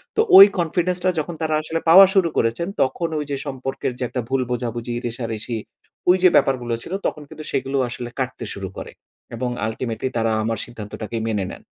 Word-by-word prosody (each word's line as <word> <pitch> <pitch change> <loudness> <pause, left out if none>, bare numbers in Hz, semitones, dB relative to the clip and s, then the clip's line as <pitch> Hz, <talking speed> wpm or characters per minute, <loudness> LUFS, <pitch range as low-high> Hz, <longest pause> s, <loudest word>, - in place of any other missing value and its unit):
তো - - +4 0.2
ওই 195 - +13
Confidence 175 +1 0
টা 185 - +3
যখন 165 +2 -4
তারা 155 -1 0
আসলে 160 +1 -3
পাওয়া 190 +4 +10
শুরু 185 -3 +4
করেছেন, 115 +9 0
তখন 165 +5 0
ওই 150 - -3
যে 140 - -1
সম্পর্কের 135 -2 -3
যে - - -2
একটা 125 - -2
ভুল 135 0 +1
বোঝাবুঝি, 120 -1 -3
রেষারেষি, 115 -1 -4 0.5
ওই 180 - +6
যে 185 - +8
ব্যাপারগুলো 125 -3 +2
ছিল, - - -7
তখন 150 - -5
কিন্তু 155 -1 -9
সেগুলো 135 +1 -1
আসলে 120 0 -6
কাটতে 130 -2 -3
শুরু 100 -2 -6
করে। - - -7 0.4
এবং 125 +1 -2 0.2
Ultimately 115 +2 -3
তারা 115 0 +1
আমার 115 +1 -1
সিদ্ধান্তটাকে 110 -1 -7
মেনে 105 -3 -1
নেন। - - -11
130 Hz, 190 wpm, -22 LUFS, 115-160 Hz, 0.5 s, ওই